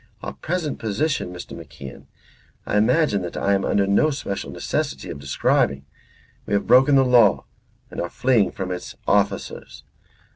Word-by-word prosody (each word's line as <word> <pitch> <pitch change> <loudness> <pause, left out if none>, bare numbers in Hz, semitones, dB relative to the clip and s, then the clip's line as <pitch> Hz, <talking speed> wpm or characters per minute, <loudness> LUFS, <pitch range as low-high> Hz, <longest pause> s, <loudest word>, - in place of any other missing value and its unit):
Our - - -5
present 170 -3 -3
position, 110 - -1
Mr. 90 -1 -9
MacIan, 75 -4 -11 0.6
I - - -2
imagine 110 - +2
that 85 -1 -6
I 100 - +1
am 95 -1 +1
under 100 - +2
no 100 +10 +3
special 135 -9 -4
necessity - - -3
of 70 - -7
describing. 70 0 0 0.6
We 105 - 0
have 100 - 0
broken 130 +4 +5
the 135 -1 +5
law 120 -5 +4 0.5
and - - -7
we 85 - -1
are - - -16
fleeing 125 -2 +2
from 95 -1 -5
its 90 - -6
officers. - - -1
100 Hz, 160 wpm, -22 LUFS, 90-130 Hz, 0.6 s, broken